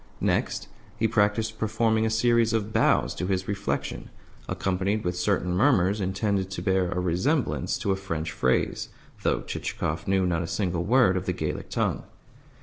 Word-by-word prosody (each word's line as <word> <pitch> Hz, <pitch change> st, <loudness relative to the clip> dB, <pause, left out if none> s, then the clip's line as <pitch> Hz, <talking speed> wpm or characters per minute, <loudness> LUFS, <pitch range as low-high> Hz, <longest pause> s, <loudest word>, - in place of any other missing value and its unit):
Next, -, -, 0 dB, 0.3 s
he 115 Hz, -, +2 dB
practised 110 Hz, 0 st, +1 dB
performing 110 Hz, 0 st, +1 dB
a -, -, +1 dB
series 115 Hz, 0 st, +3 dB
of 110 Hz, -1 st, -1 dB
bows -, -, +3 dB
to 90 Hz, -, -3 dB
his 95 Hz, -1 st, -1 dB
reflection, 100 Hz, -1 st, -3 dB, 0.4 s
accompanied 95 Hz, +3 st, -1 dB
with 90 Hz, 0 st, -1 dB
certain 90 Hz, -1 st, 0 dB
murmurs 100 Hz, -3 st, +3 dB
intended 95 Hz, 0 st, 0 dB
to 100 Hz, -, -5 dB
bear 95 Hz, -3 st, +2 dB
a 90 Hz, -, -2 dB
resemblance 90 Hz, -, 0 dB
to 100 Hz, -, -1 dB
a -, -, +2 dB
French 85 Hz, -5 st, -4 dB
phrase 65 Hz, -, 0 dB, 0.3 s
(though -, -, 0 dB
Chichikov 75 Hz, +1 st, -3 dB
knew 95 Hz, -1 st, +2 dB
not 85 Hz, -1 st, 0 dB
a 85 Hz, -, -3 dB
single 90 Hz, -2 st, -1 dB
word 115 Hz, -4 st, +4 dB
of 95 Hz, -, -4 dB
the -, -, +1 dB
Gallic -, -, -4 dB
tongue). -, -, 0 dB
95 Hz, 165 wpm, -26 LUFS, 90-110 Hz, 0.4 s, word